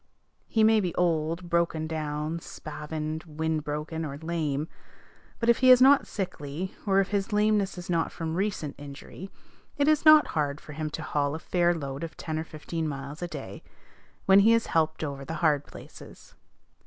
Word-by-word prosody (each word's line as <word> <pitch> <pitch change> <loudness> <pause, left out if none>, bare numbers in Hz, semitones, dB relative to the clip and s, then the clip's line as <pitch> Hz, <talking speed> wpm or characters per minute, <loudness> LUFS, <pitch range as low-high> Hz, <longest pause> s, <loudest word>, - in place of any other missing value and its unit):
He 220 - +2
may 220 0 +5
be 180 -5 -2
old, 170 0 0
broken 170 -2 0
down, 155 0 -3
spavined, 155 0 -6
wind 160 -1 -2
broken, 150 +2 -4
or 140 -3 -5
lame; 155 -2 -2 0.7
but 230 - -2
if 235 - +5
he 255 - +5
is 255 -1 +9
not 270 +2 +6
sickly, 180 -2 -5
or 195 -1 +4
if 195 - +1
his 200 +1 -1
lameness 210 -2 +2
is 175 - -7
not 170 -2 0
from 160 -1 -4
recent 185 -5 -2
injury, 145 +6 -9 0.5
it 285 0 +2
is 310 -1 +3
not 310 -1 +7
hard 145 -2 -1
for 150 - -11
him 155 +1 -3
to 155 +1 -6
haul 145 -1 -1
a - - -5
fair 175 0 +1
load 140 +1 -5
ten 155 -1 -3
or - - -2
fifteen 160 +1 -5
miles 140 +1 -6
a 175 - -2
day, 140 - -8 0.6
when 195 +1 +7
he 225 +3 +6
is 230 - +1
helped 160 -1 +1
over 140 -2 -4
the 160 +4 -5
hard 145 -2 +3
places. - - -13
160 Hz, 180 wpm, -27 LUFS, 150-190 Hz, 0.7 s, is